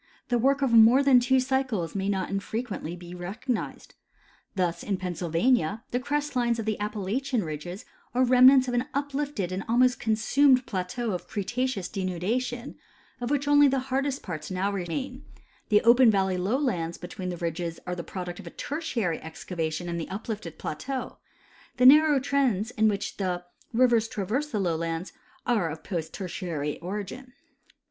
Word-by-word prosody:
The 240 -1 +2
work 275 +3 +2
of 265 - +2
more 230 +4 +7
than 270 -3 +6
two 260 +2 +3
cycles 255 -9 -1
may 195 0 -1
not 190 -2 -1
infrequently 195 -3 -3
be 175 0 -10
recognized. 210 +8 -4 0.6
Thus, 175 -2 0
in 200 -2 -2
Pennsjdvania 180 +3 0
the 245 - 0
crest 290 +2 -2
lines 240 -2 +2
of 225 - -3
the 215 -1 -1
Appalachian 210 +4 -1
ridges 165 +4 -6 0.3
are 255 - +4
remnants 255 +1 +7
of 245 - -2
an 245 +3 0
ui)lifted 280 -9 -2
and 185 +1 -3
almost 250 +2 +3
consumed 250 +4 +3
plateau 200 +4 -3
of 180 - -4
Cretaceous 220 -1 -2
denudation, 215 +6 -3 0.4
of 240 - -2
Avhich 285 0 0
only 290 0 +6
the 270 0 +2 0.2
hardest 275 0 0
parts 155 -5 -6
now 190 +2 -1
remain; 250 - -4 0.5
the 210 -2 +5
open 235 0 +7
vallev 190 -2 +1
lowlands 190 - -1
l^etween 180 +1 -6
the 175 - -4
ridges 170 0 -3
are 180 - -3
the 170 - -5
product 180 -2 -6
of - - -11
Tertiary 255 - -2
excavation 160 +1 -4
in 170 0 -3
the 165 - -5
uplifted 205 -4 -5
plateau; 255 - -5 0.6
the 250 - +3
narrow 295 +1 +7
trendies, 255 -6 +1
in 220 0 +4
wliich 200 -2 -2
the 180 -2 -2 0.3
rivers 235 -2 +3
traverse 225 +8 -2
the 215 - -2
lowlands, 165 -1 -2 0.3
are 215 -9 +1
of 160 +1 -7
post 165 -5 -4
Tertiary 170 -6 -4
origin. 205 +8 -6
215 Hz, 160 wpm, -27 LUFS, 180-255 Hz, 0.6 s, more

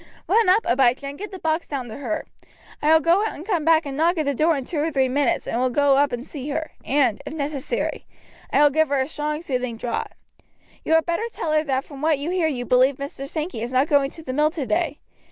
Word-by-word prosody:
Run 435 +1 +4
up, 410 +5 +4
Abijah, 255 +2 +2
and 280 +1 -6
get 415 +1 -5
the 380 - -8
box 320 -1 -1
down 270 -4 -4
to 220 - -7
her. 245 -7 -3 0.6
I 300 - +3
will 320 0 +6
go 345 +6 +3
out 440 - -2
and 315 - -9
come 360 -7 0
back 325 0 +4
and 275 -1 -5
knock 335 +4 +2
at 310 - 0
the 280 - +1
door 310 +3 +2
in 270 - -5
two 310 - -3
or 310 +2 +1
three 265 -3 +2
minutes, 275 +1 0
and 235 - -1
will 255 - +2
go 280 +2 +3
up 285 0 +3
and 245 +1 -4
see 290 -2 -7
her, 315 +2 -3
and, 265 -6 +1
if - - -7
necessary. 285 -2 -3 0.4
I 285 - +4
will 295 - +5
give 315 +2 +3
her 280 -1 +1
a 265 - 0
strong 300 +1 -3
soothing 255 -5 -2
draught. 235 +1 -3 0.7
You 320 - 0
had 325 -1 +4
better 345 +7 -1
tell 325 - -3
her 305 0 +3
that 265 -2 0
from 275 -2 -11
what 310 -1 +2
you 290 +5 -3
hear 360 -3 +1
you 250 -5 -3
believe 255 +3 +4
Mr. 275 0 -6
Sankey 310 -7 -4
is 235 +2 -4
not 260 +3 +2
going 280 -2 +3
to 325 - -11
the 255 - -4
mill 300 +3 +3
today. 325 +2 -1
290 Hz, 260 wpm, -23 LUFS, 265-320 Hz, 0.7 s, will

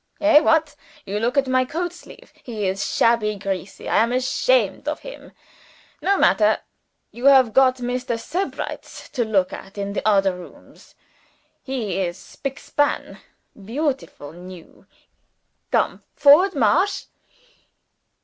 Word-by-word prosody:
Hey! 305 0 +6
what? 315 -1 +2 0.3
You 200 +2 -3
look 240 +5 -1
at 275 - +4
my 255 0 +2
coatsleeve. 345 +5 -7
He 220 -4 -5
is 190 +1 -2
shabby 225 -2 +2
greasy 195 -1 -5
I - - +1
am 230 +2 +3
ashamed 260 - +1
of - - -3
him. - - -11 0.7
No 395 +1 +2
matter. 210 - +4 0.5
You 240 +3 -7
have 265 -5 +6
got 260 0 +5
Mr. 245 -1 -3
Sebrights 355 +11 -5
to 250 -4 0
look 200 -5 0
at 195 +2 -10
in 200 0 -3
the - - -2
odder 195 -3 +3
rooms. 180 -1 -15 0.7
He 230 -9 -3
is 175 -2 -2
spick 270 +7 -7
span, 290 0 -1 0.3
beautiful 245 - -4
new. 180 0 -13 0.8
Come! - - 0
Forwards! 305 +7 +6
Marsch!" 345 - +2
240 Hz, 130 wpm, -22 LUFS, 200-290 Hz, 0.8 s, Hey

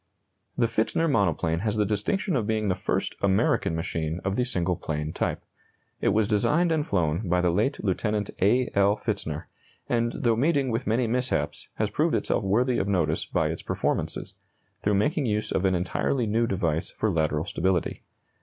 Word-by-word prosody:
The 120 - +3
Pfitzner 115 +8 +1
monoplane 85 - +1
has 105 +2 -1
the 105 - +3
distinction 125 - -1
of 110 -5 0
being 110 -2 0
the 90 - +2
first 90 - -1
American 100 -2 +2
machine 80 0 -2
of 95 0 0
the 125 - +1
single 90 -7 0
plane 75 -2 -4
type. - - -2 0.6
It - - 0
was 110 -1 +3
designed 150 +12 +2
and 160 -2 +2
flown 90 - 0
by 90 +1 +3
the 90 -1 +2
late 110 - +1
Lieut. 95 -4 -1 0.4
A. 120 +6 +3
L. 100 +1 +3
Pfitzner, 90 -9 -3 0.4
and, 120 -1 +1
though 115 -2 +2
meeting 140 +1 +2
with 115 +3 -2
many 115 +3 +2
mishaps, 115 - -1
has - - -1
proved - - +1
itself - - 0
worthy 120 +6 +2
of 95 - -1
notice 85 -6 +1
by - - 0
its - - -4
performances, - - -2 0.5
through 105 0 +2
making 140 +7 +1
use 105 0 -1
of 95 - 0
an 95 -1 +3
entirely 115 +8 0
new 115 +2 +1
device 85 -5 -1
for 110 - -1
lateral 80 -2 0
stability. 95 -3 -1
105 Hz, 180 wpm, -26 LUFS, 90-120 Hz, 0.6 s, The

